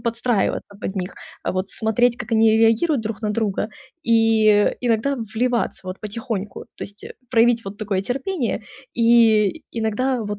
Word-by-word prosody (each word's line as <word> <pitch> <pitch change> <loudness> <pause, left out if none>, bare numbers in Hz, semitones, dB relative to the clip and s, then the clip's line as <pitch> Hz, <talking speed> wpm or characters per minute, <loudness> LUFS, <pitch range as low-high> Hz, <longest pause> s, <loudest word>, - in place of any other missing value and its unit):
подстраиваться 235 -2 -1
под 190 - -4
них, 185 -1 -4 0.3
а, - - -2
вот 185 +1 -2
смотреть, 235 +2 +1
как 225 0 -7
они 220 0 +5
реагируют 225 +5 +3
друг 220 +1 -5
на 210 - 0
друга, 210 -1 -1 0.3
и 225 -3 +4
иногда 245 +3 +1
в 230 - -4
вливаться 240 -4 -1
вот 185 +1 -5
потихоньку. 215 -1 -5
То - - -5
есть 205 +1 -12 0.3
проявить 230 -1 +3
вот 195 +1 -8
такое 205 -3 -1
терпение 255 - -2 0.3
и 230 +1 +4
иногда 235 +3 -1
вот 205 -1 -4
225 Hz, 155 wpm, -21 LUFS, 210-240 Hz, 0.3 s, они